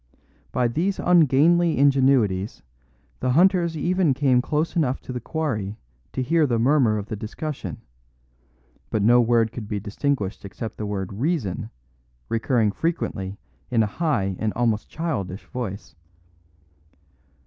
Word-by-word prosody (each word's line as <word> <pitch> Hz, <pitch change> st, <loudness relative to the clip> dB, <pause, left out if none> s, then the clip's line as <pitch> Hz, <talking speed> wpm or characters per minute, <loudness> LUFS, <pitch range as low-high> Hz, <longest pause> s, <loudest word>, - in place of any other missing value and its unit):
By 125 Hz, -1 st, +1 dB
these 175 Hz, +11 st, -1 dB
ungainly 170 Hz, +1 st, +4 dB
ingenuities 130 Hz, -8 st, +2 dB, 0.6 s
the 125 Hz, 0 st, 0 dB
hunters 175 Hz, 0 st, +3 dB
even 175 Hz, -2 st, +2 dB
came 130 Hz, -3 st, +3 dB
close 150 Hz, +5 st, -1 dB
enough 135 Hz, -6 st, +1 dB
to 130 Hz, -, -7 dB
the 125 Hz, -, -3 dB
quarry 110 Hz, -9 st, -3 dB, 0.4 s
to 130 Hz, -, -1 dB
hear 160 Hz, +3 st, +3 dB
the 120 Hz, -3 st, +1 dB
murmur 120 Hz, -2 st, +3 dB
of 100 Hz, -, -4 dB
the 110 Hz, -, -5 dB
discussion, 110 Hz, -, -5 dB, 1.1 s
but 105 Hz, -, 0 dB
no 120 Hz, +3 st, +6 dB
word 115 Hz, -1 st, +2 dB
could 110 Hz, -3 st, -7 dB
be 105 Hz, -1 st, -2 dB
distinguished 105 Hz, 0 st, -2 dB
except 110 Hz, +3 st, -7 dB
the 105 Hz, -, -4 dB
word 100 Hz, -2 st, -4 dB
"reason" 120 Hz, -, -2 dB, 0.6 s
recurring 115 Hz, -1 st, +1 dB
frequently 100 Hz, -, -3 dB, 0.3 s
in 115 Hz, -3 st, +3 dB
a 105 Hz, -, -3 dB
high 100 Hz, -, +1 dB
and 110 Hz, -1 st, 0 dB
almost 115 Hz, -3 st, 0 dB
childish 110 Hz, -, -4 dB
voice. 115 Hz, -6 st, -6 dB
125 Hz, 135 wpm, -24 LUFS, 105-150 Hz, 1.1 s, no